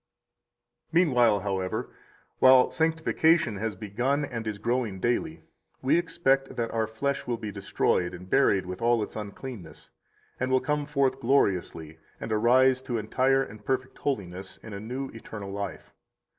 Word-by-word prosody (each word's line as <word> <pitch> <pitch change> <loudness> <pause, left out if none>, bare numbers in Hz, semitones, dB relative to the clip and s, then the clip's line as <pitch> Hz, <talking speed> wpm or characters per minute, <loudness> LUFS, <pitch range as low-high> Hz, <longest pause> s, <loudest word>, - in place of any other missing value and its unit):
57 175 +2 +3
Meanwhile, 120 -6 +3
however, 95 -2 -2 0.5
while 130 0 +7
sanctification 160 -5 +2
has 110 0 -3
begun 120 +9 -1
and 115 -5 -5
is 105 -2 -3
growing 120 -3 -1
daily, 85 -8 -1 0.4
we 130 - +3
expect 150 -6 0
that 115 -1 -2
our 110 -1 0
flesh 140 +6 -2
will 120 -1 -1
be 110 -2 -5
destroyed 95 -3 0
and 90 +1 -11
buried 100 -5 +3
with 90 +2 -7
all 120 -1 +3
its - - -8
uncleanness, 105 -3 -8 0.5
and 130 - -1
will 130 0 +4
come 150 +1 -1
forth 140 -3 +1
gloriously, 90 - 0 0.2
and 110 - -6
arise 130 +4 +4
to 120 -2 -3
entire 130 +5 +2
and 105 -3 -11
perfect 130 +2 -2
holiness 95 -8 -4
in 110 - -9
a 100 - -5
new 130 +6 -5
eternal 105 -3 -8
life. 100 -1 -6
115 Hz, 155 wpm, -27 LUFS, 100-135 Hz, 0.5 s, while